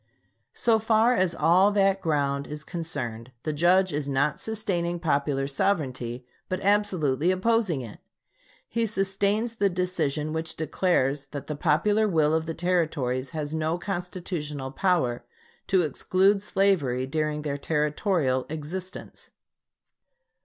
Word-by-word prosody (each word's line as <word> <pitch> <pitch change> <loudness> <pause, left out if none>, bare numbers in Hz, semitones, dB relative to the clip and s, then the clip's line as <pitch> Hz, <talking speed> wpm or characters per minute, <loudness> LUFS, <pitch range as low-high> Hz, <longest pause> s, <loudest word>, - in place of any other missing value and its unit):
So 225 -2 +3
far 220 +2 +3
as 185 -7 +1
all 185 +5 +4
that 195 -1 +3
ground 140 -3 0
is 150 0 -7
concerned, 130 -10 -5
the 155 - -2
Judge 180 +4 +3
is 145 -1 -2
not 140 +2 0
sustaining 175 -6 -1
popular 140 -4 0
sovereignty, 135 -7 -1 0.2
but 185 - -1
absolutely 185 -7 +2
opposing 185 - +1
it. 110 -3 -10 0.7
He 230 0 0
sustains 200 +3 0
the 200 -2 +3
decision 160 -5 -1
which 160 0 -3
declares 145 -4 0
that 140 0 -7
the 150 - -4
popular 195 +8 +2
will 155 -5 +2
of 160 0 0
the 165 - -3
Territories 155 -8 0
has 155 -2 -4
no 160 +1 0
constitutional 175 -7 -4
power 150 -7 +1 0.4
to 190 -3 +3
exclude 190 +6 +2
slavery 185 -12 +1
during 150 +1 -2
their 145 -1 -3
territorial 150 -2 0
existence." 165 +5 -7
165 Hz, 125 wpm, -26 LUFS, 145-190 Hz, 0.7 s, all